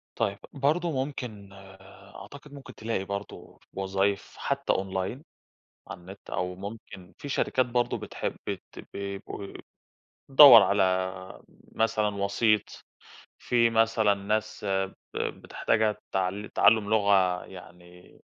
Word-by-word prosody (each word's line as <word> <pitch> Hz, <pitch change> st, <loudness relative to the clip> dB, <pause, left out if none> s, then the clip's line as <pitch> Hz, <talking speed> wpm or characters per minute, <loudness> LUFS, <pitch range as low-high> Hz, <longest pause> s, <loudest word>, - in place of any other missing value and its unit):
طيب، 100 Hz, 0 st, -1 dB
برضه 155 Hz, +5 st, +1 dB
ممكن 125 Hz, -8 st, -5 dB, 0.7 s
أعتقد 140 Hz, +9 st, -12 dB
ممكن 140 Hz, -1 st, -11 dB
تلاقي 110 Hz, -3 st, -3 dB
برضه 100 Hz, +1 st, -7 dB
وظايف 95 Hz, +1 st, -1 dB
حتى 140 Hz, 0 st, -1 dB
أونلاين 95 Hz, +7 st, -3 dB, 0.7 s
على -, -, -8 dB
النت 95 Hz, +3 st, -13 dB
أو 90 Hz, 0 st, -2 dB
ممكن 95 Hz, -2 st, -10 dB
في 145 Hz, -, -8 dB
شركات 130 Hz, -2 st, +1 dB
برضه 120 Hz, 0 st, 0 dB
بتحب -, -, -5 dB
بت -, -, -4 dB, 0.3 s
بيبقوا 100 Hz, 0 st, -6 dB, 0.8 s
دوّر 135 Hz, -5 st, +10 dB
على 100 Hz, 0 st, +2 dB, 0.9 s
مثلًا 110 Hz, -1 st, +1 dB
وسيط، 100 Hz, +2 st, 0 dB, 0.6 s
في 120 Hz, -1 st, +2 dB
مثلًا 110 Hz, -2 st, +3 dB
ناس 105 Hz, +2 st, -3 dB, 0.5 s
ب -, -, -5 dB
بتحتاجها 110 Hz, -1 st, -1 dB
تعل 95 Hz, +2 st, -2 dB
تعلم 110 Hz, -2 st, +4 dB
لغة 100 Hz, -4 st, +2 dB
يعني 90 Hz, -1 st, -15 dB
105 Hz, 110 wpm, -27 LUFS, 95-115 Hz, 0.9 s, دوّر